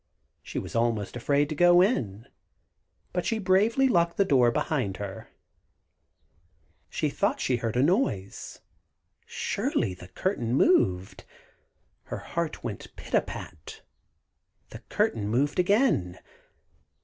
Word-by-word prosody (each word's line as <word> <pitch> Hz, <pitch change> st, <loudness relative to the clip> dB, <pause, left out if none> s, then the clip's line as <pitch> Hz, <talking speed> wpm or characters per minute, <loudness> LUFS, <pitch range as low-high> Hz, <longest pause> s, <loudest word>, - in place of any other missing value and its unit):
She -, -, -8 dB
was -, -, -5 dB
almost 115 Hz, -3 st, 0 dB
afraid 140 Hz, +4 st, +1 dB
to 155 Hz, -, -3 dB
go 175 Hz, +2 st, +6 dB
in, 115 Hz, -, +1 dB, 0.9 s
but 180 Hz, -, -1 dB
she 225 Hz, -, 0 dB
bravely 215 Hz, +7 st, +3 dB
locked 170 Hz, -8 st, +2 dB
the 200 Hz, -, +4 dB
door 130 Hz, -8 st, +4 dB
behind 120 Hz, -5 st, -1 dB
her. 100 Hz, -2 st, -7 dB, 1.6 s
She -, -, -1 dB
thought -, -, 0 dB
she 125 Hz, -, +1 dB
heard 115 Hz, -1 st, -3 dB
a 125 Hz, -, +3 dB
noise. 145 Hz, -, -1 dB, 0.7 s
Surely 95 Hz, -, -1 dB
the 90 Hz, 0 st, -12 dB
curtain 120 Hz, -, -2 dB
moved! 95 Hz, -, +2 dB, 0.8 s
Her -, -, -5 dB
heart 170 Hz, -2 st, -4 dB
went 110 Hz, -5 st, -7 dB
pit -, -, -12 dB
a -, -, +5 dB
pat! 75 Hz, -, -9 dB, 0.9 s
The -, -, -8 dB
curtain 105 Hz, -3 st, 0 dB
moved 140 Hz, +9 st, 0 dB
again. 180 Hz, -, +2 dB
130 Hz, 125 wpm, -27 LUFS, -, 1.6 s, go